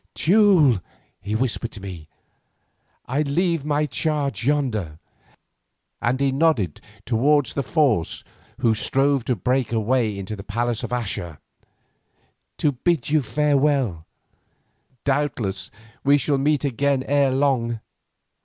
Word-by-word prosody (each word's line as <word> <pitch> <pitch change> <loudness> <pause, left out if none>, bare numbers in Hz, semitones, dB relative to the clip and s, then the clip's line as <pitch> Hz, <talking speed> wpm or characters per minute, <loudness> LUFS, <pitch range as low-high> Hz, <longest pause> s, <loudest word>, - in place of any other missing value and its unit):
"Teule," 175 - +4 0.4
he 105 +2 -3
whispered 115 -1 -1
to 105 - -8
me, 90 -5 -8 1.0
"I 135 +4 -1
leave 165 +2 0
my 150 0 +1
charge 145 -6 -1
yonder," 120 - -1 1.0
and 125 +3 0
he 140 -1 +2
nodded 135 - +1 0.2
towards 130 +3 +2
the 140 - -1
force 135 - 0 0.4
who 115 - +4
strove 135 +3 +1
to 125 - +1
break 125 +4 0
a 115 - +1
way 110 -2 0
into 100 +2 -5
the 100 - -9
palace 115 +2 -2
of - - -4
Axa, 100 -10 -3 1.2
"to 150 - +2
bid 145 +1 -1
you 155 -1 +4
farewell. 140 - +1 1.0
Doubtless 125 -10 -1 0.3
we 140 +1 +5
shall 140 -1 0
meet 145 +1 +1
again 140 +1 0
ere 140 0 +2
long. 130 -4 +1
130 Hz, 125 wpm, -23 LUFS, 110-145 Hz, 1.2 s, we